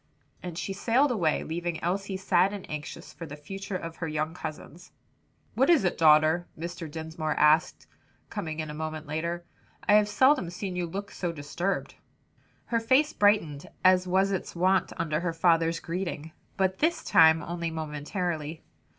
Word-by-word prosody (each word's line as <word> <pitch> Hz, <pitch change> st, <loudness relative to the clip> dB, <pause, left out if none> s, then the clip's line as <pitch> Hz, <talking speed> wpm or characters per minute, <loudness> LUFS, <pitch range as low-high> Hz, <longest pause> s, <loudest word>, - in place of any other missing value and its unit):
And 175 Hz, -2 st, -7 dB
she 195 Hz, +2 st, -3 dB
sailed 245 Hz, +8 st, +2 dB
away, 170 Hz, -10 st, +1 dB
leaving 170 Hz, +1 st, -3 dB
Elsie 195 Hz, +2 st, -1 dB
sad 190 Hz, 0 st, +2 dB
and 200 Hz, -2 st, -7 dB
anxious 150 Hz, -1 st, -7 dB
for 165 Hz, -, -8 dB
the 145 Hz, -, -8 dB
future 195 Hz, +6 st, -6 dB
of 165 Hz, -2 st, -8 dB
her 165 Hz, -, -3 dB
young 155 Hz, +1 st, -2 dB
cousins. 165 Hz, +1 st, -8 dB, 0.6 s
"What 265 Hz, +5 st, +2 dB
is 330 Hz, -, +5 dB
it, 180 Hz, -, +1 dB
daughter?" 155 Hz, +2 st, +4 dB
Mr. 170 Hz, 0 st, -6 dB
Dinsmore 160 Hz, 0 st, -4 dB
asked, 150 Hz, +1 st, +3 dB, 0.5 s
coming 155 Hz, -1 st, -4 dB
in 155 Hz, -1 st, -4 dB
a -, -, -7 dB
moment 155 Hz, 0 st, -5 dB
later. 170 Hz, +3 st, -3 dB, 0.4 s
"I 205 Hz, -, +5 dB
have 210 Hz, 0 st, +5 dB
seldom 260 Hz, -, +3 dB
seen 180 Hz, +1 st, -5 dB
you 180 Hz, -1 st, -2 dB
look 200 Hz, +4 st, -6 dB
so 175 Hz, -2 st, -3 dB
disturbed." 165 Hz, +5 st, -3 dB, 0.7 s
Her 230 Hz, -, 0 dB
face 260 Hz, +7 st, +3 dB
brightened, 185 Hz, -9 st, +2 dB, 0.2 s
as 185 Hz, 0 st, +5 dB
was 190 Hz, +2 st, +2 dB
its 190 Hz, -2 st, -3 dB
wont 185 Hz, +1 st, +2 dB
under 155 Hz, -2 st, -1 dB
her 170 Hz, -1 st, -2 dB
father's 165 Hz, 0 st, +2 dB
greeting, 170 Hz, -3 st, -4 dB, 0.3 s
but, 190 Hz, -1 st, +1 dB
this 330 Hz, +3 st, +1 dB
time, 160 Hz, 0 st, +5 dB
only 170 Hz, -1 st, -3 dB
momentarily. 160 Hz, +1 st, -4 dB
170 Hz, 165 wpm, -28 LUFS, 160-195 Hz, 0.7 s, is